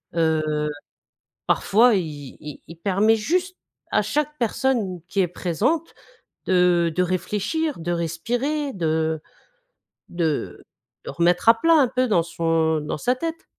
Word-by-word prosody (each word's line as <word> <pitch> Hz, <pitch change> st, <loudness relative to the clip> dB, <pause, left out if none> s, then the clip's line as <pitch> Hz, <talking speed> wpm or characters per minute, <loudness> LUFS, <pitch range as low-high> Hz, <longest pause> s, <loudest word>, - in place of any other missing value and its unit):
Heu, 160 Hz, -2 st, +2 dB, 1.1 s
parfois 230 Hz, +3 st, +4 dB
il 150 Hz, -7 st, -4 dB
il 150 Hz, -1 st, -9 dB
il 165 Hz, -, -11 dB
permet 200 Hz, +5 st, +2 dB
juste 360 Hz, -, -1 dB, 0.4 s
à -, -, +3 dB
chaque 300 Hz, 0 st, -2 dB
personne 230 Hz, -6 st, 0 dB
qui 200 Hz, -, -1 dB
est 180 Hz, -, +2 dB
présente 205 Hz, -, -1 dB, 0.5 s
de 180 Hz, -2 st, +3 dB
de 180 Hz, -, +2 dB
réfléchir, 210 Hz, -, -2 dB
de 175 Hz, +1 st, -2 dB
respirer, 245 Hz, -, -2 dB
de 160 Hz, -4 st, -1 dB, 0.9 s
de 165 Hz, -4 st, -2 dB, 0.4 s
remettre 175 Hz, +5 st, +2 dB
à 230 Hz, 0 st, +6 dB
plat 330 Hz, +4 st, +4 dB
un 285 Hz, -5 st, +5 dB
peu 255 Hz, +1 st, 0 dB
dans 180 Hz, -7 st, +2 dB
son 165 Hz, -1 st, 0 dB
dans 150 Hz, -, -4 dB
sa 245 Hz, +11 st, 0 dB
tête. 330 Hz, +5 st, -5 dB
185 Hz, 135 wpm, -23 LUFS, 165-255 Hz, 1.1 s, à